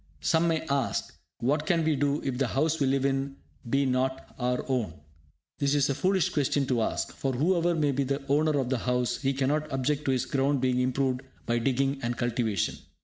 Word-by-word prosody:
Some 165 Hz, +1 st, +2 dB
may 160 Hz, -1 st, +1 dB
ask, 140 Hz, -4 st, -1 dB, 0.3 s
"What 145 Hz, +5 st, +1 dB
can 170 Hz, -3 st, +2 dB
we 155 Hz, -1 st, +2 dB
do 145 Hz, +1 st, 0 dB
if 130 Hz, -2 st, -2 dB
the 135 Hz, -, +2 dB
house 155 Hz, +6 st, 0 dB
we 140 Hz, -, +2 dB
live 135 Hz, 0 st, +1 dB
in 135 Hz, 0 st, 0 dB, 0.3 s
be 140 Hz, +2 st, +2 dB
not 130 Hz, 0 st, -1 dB
our 125 Hz, 0 st, 0 dB
own?" 120 Hz, -11 st, -1 dB, 0.6 s
This 140 Hz, 0 st, +2 dB
is 140 Hz, -1 st, +2 dB
a -, -, +1 dB
foolish 185 Hz, +3 st, +1 dB
question 145 Hz, -3 st, +1 dB
to 120 Hz, -3 st, +2 dB
ask, -, -, -2 dB
for, 135 Hz, -1 st, -2 dB
whoever 170 Hz, +5 st, +2 dB
may 150 Hz, -3 st, +2 dB
be 140 Hz, +1 st, 0 dB
the 140 Hz, +1 st, -2 dB
owner 150 Hz, +2 st, +2 dB
of 130 Hz, -2 st, -1 dB
the 130 Hz, -2 st, 0 dB
house, 125 Hz, 0 st, 0 dB
he 135 Hz, 0 st, +2 dB
cannot 145 Hz, +3 st, 0 dB
object 140 Hz, +3 st, -1 dB
to 135 Hz, -, +2 dB
his 130 Hz, -2 st, 0 dB
ground 140 Hz, +1 st, +1 dB
being 125 Hz, -1 st, +1 dB
improved 130 Hz, 0 st, 0 dB, 0.2 s
by 120 Hz, 0 st, +1 dB
digging 135 Hz, +3 st, 0 dB
and 120 Hz, 0 st, -2 dB
cultivation. 115 Hz, -5 st, -1 dB
135 Hz, 205 wpm, -28 LUFS, 125-145 Hz, 0.6 s, Some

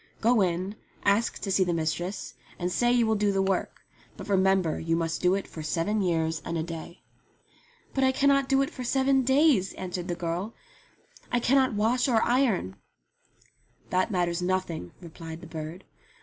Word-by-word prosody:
"Go 230 Hz, 0 st, +3 dB
in, 185 Hz, +3 st, -1 dB, 0.3 s
ask 205 Hz, +3 st, +2 dB
to 195 Hz, -, -2 dB
see 190 Hz, 0 st, +4 dB
the 175 Hz, -2 st, 0 dB
mistress, 165 Hz, +4 st, -3 dB, 0.2 s
and 180 Hz, 0 st, -2 dB
say 240 Hz, +5 st, +2 dB
you 245 Hz, -1 st, +3 dB
will 220 Hz, -, +2 dB
do 205 Hz, -1 st, +1 dB
the 195 Hz, -, 0 dB
work; 190 Hz, -1 st, -2 dB, 0.3 s
but -, -, -8 dB
remember 190 Hz, -3 st, +2 dB
you 165 Hz, 0 st, 0 dB
must 165 Hz, -1 st, -2 dB
do 180 Hz, +1 st, +3 dB
it 195 Hz, -, -3 dB
for 160 Hz, -, -8 dB
seven 175 Hz, +7 st, 0 dB
years 165 Hz, -3 st, 0 dB
and 170 Hz, -, -3 dB
a 160 Hz, -, -1 dB
day." 165 Hz, +1 st, -8 dB, 0.9 s
"But 270 Hz, -, +1 dB
I 260 Hz, -, +4 dB
cannot 275 Hz, 0 st, +2 dB
do 270 Hz, 0 st, +4 dB
it 280 Hz, -, -4 dB
for 255 Hz, -, -7 dB
seven 265 Hz, +2 st, +2 dB
days," 265 Hz, -, +3 dB
answered 180 Hz, -1 st, -5 dB
the 175 Hz, -, -2 dB
girl. 175 Hz, +6 st, -3 dB, 0.8 s
"I 245 Hz, -, +2 dB
cannot 260 Hz, -1 st, +3 dB
wash 230 Hz, +5 st, +2 dB
or 230 Hz, -4 st, +3 dB
iron." 235 Hz, -, +1 dB, 1.1 s
"That 185 Hz, +3 st, +2 dB
matters 175 Hz, -3 st, 0 dB
nothing," 180 Hz, -, -2 dB
replied 165 Hz, -1 st, -9 dB
the -, -, -10 dB
bird. 160 Hz, +3 st, -7 dB
190 Hz, 180 wpm, -27 LUFS, 170-235 Hz, 1.1 s, see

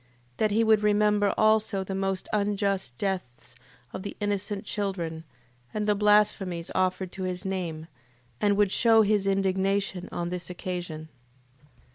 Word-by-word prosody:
That 215 Hz, -, +2 dB
he 220 Hz, +2 st, +2 dB
would 220 Hz, -1 st, +4 dB
remember 210 Hz, -1 st, +3 dB
also 215 Hz, -2 st, +3 dB
the 195 Hz, -, -5 dB
most 195 Hz, -1 st, -2 dB
unjust 200 Hz, -, 0 dB
deaths 180 Hz, -12 st, -4 dB, 0.4 s
of -, -, -6 dB, 0.2 s
innocent 205 Hz, -1 st, -2 dB
children, 170 Hz, -6 st, -3 dB, 0.5 s
and 210 Hz, 0 st, -1 dB
the 210 Hz, -, +4 dB
blasphemies 205 Hz, -4 st, +2 dB
offered 185 Hz, 0 st, 0 dB
to 190 Hz, -, -8 dB
his 180 Hz, 0 st, -4 dB
name, 175 Hz, -5 st, -3 dB, 0.6 s
and 205 Hz, -1 st, +3 dB
would 205 Hz, -2 st, +3 dB
shew 225 Hz, -1 st, +5 dB
his 205 Hz, -1 st, +1 dB
indignation 195 Hz, -1 st, 0 dB
on 175 Hz, 0 st, -3 dB
this 180 Hz, 0 st, -5 dB
occasion. 175 Hz, -4 st, -5 dB
195 Hz, 135 wpm, -27 LUFS, 180-210 Hz, 0.6 s, shew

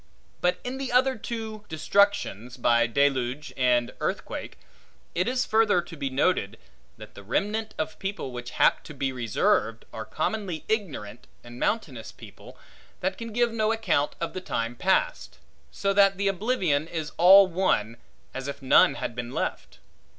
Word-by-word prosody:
But 180 Hz, 0 st, +1 dB
in 255 Hz, +2 st, -5 dB
the 270 Hz, -2 st, -3 dB
other 260 Hz, +2 st, +3 dB
two 220 Hz, -1 st, -6 dB
destructions, 160 Hz, -, +1 dB
by 120 Hz, -1 st, +3 dB
deluge 135 Hz, +2 st, 0 dB
and 125 Hz, -1 st, +2 dB
earthquake, -, -, -4 dB, 0.6 s
it 180 Hz, +2 st, 0 dB
is 255 Hz, 0 st, 0 dB
further 220 Hz, -4 st, +3 dB
to 175 Hz, -1 st, -7 dB
be 140 Hz, -3 st, -3 dB
noted, 130 Hz, -, 0 dB, 0.4 s
that -, -, -12 dB
the -, -, -11 dB
remnant 210 Hz, -, -2 dB
of 210 Hz, 0 st, -4 dB
people 195 Hz, -8 st, -4 dB
which 120 Hz, -1 st, -6 dB
hap -, -, +4 dB
to 150 Hz, -, -10 dB
be 135 Hz, -1 st, -1 dB
reserved, 115 Hz, -1 st, 0 dB
are 110 Hz, -, -5 dB
commonly 180 Hz, -, -3 dB
ignorant 140 Hz, -, -3 dB, 0.2 s
and 120 Hz, +1 st, -11 dB
mountainous 135 Hz, -, -2 dB
people, -, -, -14 dB, 0.4 s
that 190 Hz, +1 st, -1 dB
can 230 Hz, +1 st, -7 dB
give 240 Hz, +1 st, +1 dB
no 220 Hz, -1 st, +1 dB
account 190 Hz, -10 st, 0 dB
of 170 Hz, -, -3 dB
the 185 Hz, -, -5 dB
time 115 Hz, -8 st, -3 dB
past; 190 Hz, +8 st, 0 dB, 0.3 s
so 195 Hz, 0 st, -1 dB
that 195 Hz, -1 st, +4 dB
the 200 Hz, 0 st, 0 dB
oblivion 190 Hz, -, 0 dB
is 160 Hz, -3 st, -4 dB
all 190 Hz, +3 st, +9 dB
one, 165 Hz, -, 0 dB, 0.4 s
as 135 Hz, 0 st, -5 dB
if 140 Hz, -, -5 dB
none 135 Hz, -2 st, +5 dB
had 115 Hz, -, -4 dB
been 120 Hz, 0 st, -5 dB
left. -, -, -4 dB
170 Hz, 160 wpm, -26 LUFS, 125-210 Hz, 0.6 s, all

